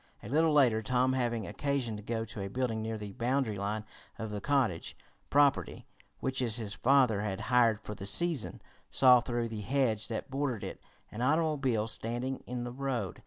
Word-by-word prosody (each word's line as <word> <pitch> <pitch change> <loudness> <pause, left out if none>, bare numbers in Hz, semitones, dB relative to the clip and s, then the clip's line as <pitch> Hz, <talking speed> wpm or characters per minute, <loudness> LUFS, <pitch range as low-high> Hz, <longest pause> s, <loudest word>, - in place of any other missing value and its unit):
A 105 - -8
little 160 +4 +3
later, 125 -7 +4
Tom 125 +3 +1
having 120 -4 -1
occasion 135 +2 -2
to 105 - -7
go 115 +1 -3
to 105 -1 -7
a 95 - -3
building 115 0 -2
near 110 0 -3
the 105 -1 -7
boundary 120 -3 -1
line 105 +2 -3 0.3
of 110 -1 -5
the 105 -1 -4
cottage 130 -12 0 0.3
property 145 -1 +2 0.4
which 130 0 -1
his 115 -4 0
father 125 -4 +3
had 95 -3 -3
hired 115 -3 +4
for 105 - -7
the 100 -1 -5
season, 155 +6 +3 0.3
saw, 125 -2 +6
through 120 -1 -2
the 110 -2 -5
hedge 110 -3 0
that 115 +3 -5
bordered 135 -5 -2
it, - - -7 0.3
an 110 - -6
automobile 135 -6 +1
standing 120 +4 -3
in 125 0 -4
the 120 - -5
road. 125 -7 -3
120 Hz, 180 wpm, -31 LUFS, 110-130 Hz, 0.4 s, saw